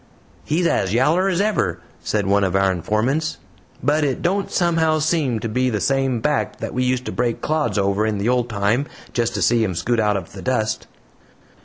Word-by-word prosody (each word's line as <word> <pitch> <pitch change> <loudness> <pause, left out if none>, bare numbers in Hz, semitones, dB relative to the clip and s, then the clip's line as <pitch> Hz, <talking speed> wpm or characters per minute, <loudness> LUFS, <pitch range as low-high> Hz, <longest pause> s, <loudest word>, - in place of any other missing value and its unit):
"He's 170 +4 0
as 95 - +1
yaller 165 +10 +3
as 180 -2 0
ever," 200 - 0 0.2
said 105 -2 0
one 100 +1 +3
of 95 -1 0
our 95 0 +3
informants, 110 - -1 0.5
"but 150 +3 +2
it 135 -3 -1
don't 195 +3 0
somehow 165 -3 +2
seem 155 -6 0
to 115 - -2
be 125 +4 0
the 110 -3 -1
same 135 -1 0
back 150 +2 0
that - - -5
we 125 - 0
used 125 0 0
to - - -3
break 120 -2 -1
clods 155 -6 0
over 100 +1 +1
in 110 -2 -1
the 100 +3 -1
old 125 -1 +1
time, 110 +6 0 0.3
just 120 0 0
to - - 0
see 120 -2 +3
him 95 -5 -1
scoot 115 +8 0
out 105 -2 +2
of 90 -4 -7
the 95 - -8
dust." 110 -3 -1
120 Hz, 205 wpm, -21 LUFS, 105-150 Hz, 0.5 s, yaller